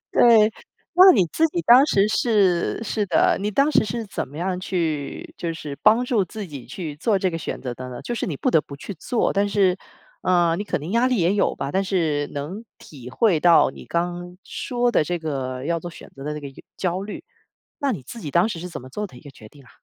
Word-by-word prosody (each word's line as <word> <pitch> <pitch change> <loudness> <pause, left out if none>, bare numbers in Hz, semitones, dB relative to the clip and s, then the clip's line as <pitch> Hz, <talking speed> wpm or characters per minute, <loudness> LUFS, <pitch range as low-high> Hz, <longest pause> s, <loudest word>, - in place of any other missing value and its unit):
对， 225 -2 +6 0.4
那 370 +2 +9
你 190 -7 +3
自 325 - +3
己 345 +3 -2
当 255 +2 +7
时 200 -6 +3
是 205 -4 +1
是 210 -2 -2
的， 175 - +3
你 205 +1 -1
当 275 +8 +2
时 220 - +3
是 230 +2 -4
怎 195 - -4
么 145 - -13
样 180 +1 -2
去 160 -6 -3
就 170 -1 -3
是 150 -3 -7
帮 220 +3 +5
助 235 -6 +1
自 205 +3 -7
己 140 -7 -9
去 160 -7 -6
做 200 +6 +1
这 185 -1 0
个 165 - -4
选 - - -5
择 125 -2 -5
的 130 +1 -8
呢？ 125 -1 -8
就 240 - -4
是 230 - -3
你 155 - -3
不 - - 0
得 160 - +4
不 140 - -11
去 195 +8 -8
做， 225 +8 -1
但 200 +1 +1
是 195 -3 +2 0.5
呃， 175 -2 +3
你 205 - -3
可 205 - -2
能 155 +5 -7
压 235 +4 +3
力 255 - +1
也 180 0 +2
有 205 - +1
吧， 140 - -4
但 195 +4 0
是 160 -7 0
能 165 +10 -6
体 130 -5 -12
会 180 - +2
到 170 0 +5
你 - - -12
刚 175 +1 -3
说 245 -1 -1
的 160 - +2
这 175 +3 -2
个 135 -5 -4
要 170 +2 0
做 175 +1 -7
选 - - -13
择 135 - -10
的 150 +1 -3
这 150 - -6
个 140 - -7
由 135 - -15 0.2
焦 185 0 -2
虑， 205 +1 -7 0.6
那 280 -5 0
你 185 - -5
自 230 - -10
己 150 - -6
当 175 +7 +3
时 210 - -5
是 180 +2 -6
怎 175 - -7
么 130 - -11
做 210 +10 -4
的 150 - -16
一 - - -12
个 145 - -12
决 110 -5 -15
定 140 +4 -18
啊？ 125 - -19
180 Hz, 270 characters per minute, -23 LUFS, 150-215 Hz, 0.6 s, 那